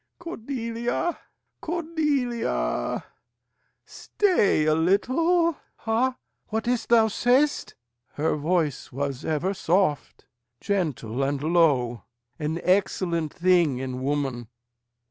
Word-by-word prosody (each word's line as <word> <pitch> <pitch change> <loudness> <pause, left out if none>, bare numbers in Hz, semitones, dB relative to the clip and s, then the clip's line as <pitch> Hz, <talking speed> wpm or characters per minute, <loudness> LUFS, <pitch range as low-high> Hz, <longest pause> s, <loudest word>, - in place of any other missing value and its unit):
Cordelia, 245 -1 -3 0.4
Cordelia! 275 - -1 0.8
stay 350 - +1
a 155 - +3
little. 310 - +2 0.2
Ha! 235 +3 0 0.3
What 220 +1 -3
is't 245 -1 0
thou 230 -2 +6
say'st, 250 +6 +1 0.4
Her 155 +2 0
voice 155 -2 -1
was 140 +1 -3
ever 160 +5 -1
soft, 180 -5 0 0.3
Gentle, 145 - -2
and 140 +1 -1
low 145 -8 +2 0.4
an 155 +2 -2
excellent 175 -4 +1
thing 175 -6 +2
in 130 0 -4
woman. 135 -4 -2
180 Hz, 90 wpm, -25 LUFS, 145-245 Hz, 0.8 s, thou